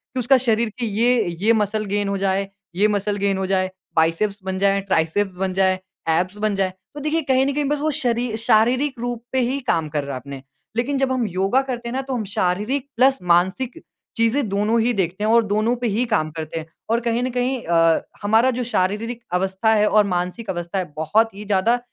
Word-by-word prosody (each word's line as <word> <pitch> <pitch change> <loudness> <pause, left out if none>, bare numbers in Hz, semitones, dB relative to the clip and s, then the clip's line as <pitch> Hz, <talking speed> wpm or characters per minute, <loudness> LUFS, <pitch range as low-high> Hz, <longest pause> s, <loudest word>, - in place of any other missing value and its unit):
कि 255 - 0
उसका 260 +2 +4
शरीर 230 -2 +1
की 235 - -1 0.2
ये 240 -2 +3 0.2
ये 225 +2 +4
मसल 215 0 0
गेन 205 0 -1
हो 200 - -1
जाए 195 0 0 0.3
ये 205 +4 +4
मसल 205 0 -1
गेन 200 -1 0
हो 190 - -1
जाए, 185 -1 +1 0.3
बाइसेप्स 165 +6 +1
बन 190 0 -2
जाएँ, 200 0 +2
ट्राइसेप्स 190 +1 0
बन 190 0 -1
जाएँ, 185 0 +2 0.3
ऐब्स 185 +5 +1
बन 210 -1 0
जाएँ। 190 -1 0 0.2
तो - - -5
देखिए, 305 +3 0
कहीं 265 -1 +2
ना 280 - +1
कहीं 295 +1 0
बस 295 -1 0
वो 310 0 +1
शरी 245 -5 0
शारीरिक 245 +4 +2
रूप 240 -1 -4
पे 260 - +1
ही 275 +1 -1
काम 160 -2 +1
कर 145 -1 -2
रहा 140 -2 -5
अपने। 135 +1 -9 0.4
लेकिन 270 +4 0
जब 265 -1 +1
हम 255 -2 0
योगा 195 +7 +1
करते 245 -3 -5
हैं 235 - -5
ना, 265 - 0
तो 270 0 -5
हम 225 - -2
शारीरिक 210 +7 -1
प्लस 270 +2 +4
मानसिक 190 - +1 0.4
चीज़ें 230 +2 +2
दोनों 210 +4 +1
ही 240 +2 +2
देखते 190 +1 -2
हैं 220 - +2
और 230 0 +5
दोनों 215 +4 +1
पे 240 - +1
ही 225 +4 +1
काम 205 -9 0
करते 160 0 -5
हैं 155 - -7 0.2
और 230 +1 +2
कहीं 235 +1 0
ना 255 - 0
कहीं 250 0 0
अ, 165 -1 +3 0.2
हमारा 225 +5 +3
जो 250 0 -2
शारीरिक 230 +2 -1
अवस्था 190 +4 +1
है 210 0 +3
और 210 0 +4
मानसिक 180 +5 -3
अवस्था 175 +1 -3
है, 185 - -2
बहुत 215 +8 +2
ही 210 +1 -8
ज़्यादा 210 +5 +2
215 Hz, 220 wpm, -21 LUFS, 190-245 Hz, 0.4 s, और